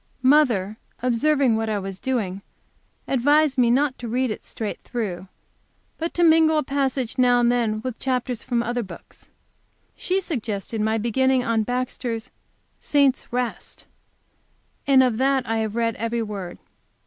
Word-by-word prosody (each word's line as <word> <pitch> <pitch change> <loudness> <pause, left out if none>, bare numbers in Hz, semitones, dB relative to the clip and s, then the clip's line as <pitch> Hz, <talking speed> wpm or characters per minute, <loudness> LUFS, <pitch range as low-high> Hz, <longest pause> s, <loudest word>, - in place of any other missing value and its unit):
Mother, 245 -8 +3 0.3
observing 255 0 +2
what 225 0 -2
I 215 - 0
was 195 -1 -6
doing, 205 -8 -2 0.7
advised 290 +2 +3
me 245 -3 +3 0.3
to 240 - -6
read 250 +1 0
it - - -6
straight 215 -2 -5
through, 195 -6 -4 0.7
but 330 +1 -2
to 345 - +2
mingle 320 -1 +5
a 305 - +1
passage 265 -2 -2
now 245 -1 +5
and 240 0 +3
then 225 -3 0
with 255 -3 -5
chapters 250 -2 -2
from 235 -1 -1
other 240 +1 -2
books. 200 - -12 0.7
She 370 +1 -1
suggested 220 - -4
my 220 +1 +1
beginning 255 +3 +1
on 230 -2 +1
Baxter's 245 -1 -3 0.5
"Saints' 280 -3 +1
Rest," 245 -1 -4 1.0
and 265 -2 +6
of 245 -3 0
that 270 0 +1
I 225 0 0
have 220 -1 -2
read 230 -2 0
every 230 +1 -2
word. 195 -5 -6
245 Hz, 150 wpm, -23 LUFS, 220-265 Hz, 1.0 s, and